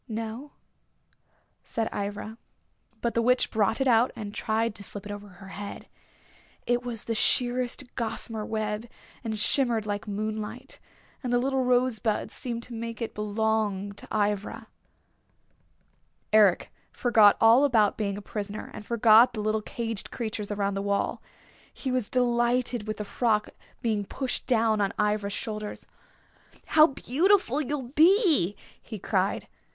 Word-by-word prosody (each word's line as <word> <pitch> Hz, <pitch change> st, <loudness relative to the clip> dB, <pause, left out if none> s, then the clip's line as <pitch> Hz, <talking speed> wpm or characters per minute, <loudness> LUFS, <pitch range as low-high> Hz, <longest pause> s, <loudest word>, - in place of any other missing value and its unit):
"No," 225 Hz, +5 st, -5 dB, 1.1 s
said 225 Hz, -1 st, -2 dB
Ivra. 205 Hz, +3 st, -5 dB, 0.6 s
But 235 Hz, -, 0 dB
the 235 Hz, -, +2 dB
Witch 250 Hz, +2 st, +2 dB
brought 220 Hz, +1 st, +1 dB
it 270 Hz, -, +1 dB
out 240 Hz, 0 st, +4 dB
and 205 Hz, -2 st, -6 dB
tried 220 Hz, +1 st, 0 dB
to 205 Hz, -, -6 dB
slip 200 Hz, 0 st, -8 dB
it 205 Hz, -, -6 dB
over 205 Hz, 0 st, -7 dB
her 190 Hz, 0 st, -13 dB
head. 200 Hz, +1 st, -7 dB, 0.8 s
It 245 Hz, 0 st, +1 dB
was 240 Hz, -3 st, -5 dB
sheerest 245 Hz, +2 st, +1 dB
gossamer 225 Hz, -2 st, -4 dB
web, 215 Hz, +1 st, -3 dB, 0.3 s
and 220 Hz, -2 st, -3 dB
shimmered 235 Hz, -1 st, +3 dB
like 205 Hz, 0 st, -3 dB
moonlight. 215 Hz, +5 st, -5 dB, 0.4 s
And 250 Hz, -3 st, -3 dB
the 245 Hz, -, +4 dB
little 265 Hz, +1 st, +1 dB
rosebuds 245 Hz, -4 st, +1 dB
seemed 235 Hz, -2 st, -5 dB
to 245 Hz, -, -10 dB
make 230 Hz, -1 st, -5 dB
it 230 Hz, -, -4 dB
belong 210 Hz, -1 st, -1 dB
to 200 Hz, -, -11 dB
Ivra. 205 Hz, -1 st, -1 dB, 1.6 s
Eric 205 Hz, -5 st, +4 dB, 0.2 s
forgot 220 Hz, -4 st, +5 dB
all 230 Hz, +5 st, +6 dB
about 225 Hz, -7 st, +3 dB
being 200 Hz, -2 st, -2 dB
a 205 Hz, -, -8 dB
prisoner, 205 Hz, 0 st, -5 dB
and -, -, -8 dB
forgot 230 Hz, +2 st, +5 dB
the 215 Hz, -, -3 dB
little 215 Hz, +1 st, 0 dB
caged 225 Hz, -2 st, -4 dB
creatures 215 Hz, -3 st, -4 dB
around 200 Hz, -1 st, -1 dB
the 195 Hz, -, -2 dB
wall. 200 Hz, 0 st, -1 dB, 0.5 s
He 265 Hz, -, -4 dB
was 250 Hz, -4 st, -1 dB
delighted 240 Hz, -2 st, +1 dB
with 215 Hz, -1 st, -3 dB
the 210 Hz, -, -4 dB
frock 210 Hz, -1 st, 0 dB, 0.3 s
being 215 Hz, -3 st, 0 dB
pushed 260 Hz, +5 st, -4 dB
down 225 Hz, -3 st, +2 dB
on 200 Hz, +1 st, 0 dB
Ivra's 210 Hz, -1 st, 0 dB
shoulders. 215 Hz, -1 st, -5 dB, 0.8 s
"How 310 Hz, 0 st, +6 dB
beautiful 300 Hz, -, +2 dB
you'll 275 Hz, -3 st, -3 dB
be!" 315 Hz, -, +4 dB, 0.3 s
he 220 Hz, -, -8 dB
cried. 195 Hz, 0 st, -1 dB
220 Hz, 145 wpm, -27 LUFS, 210-245 Hz, 1.6 s, all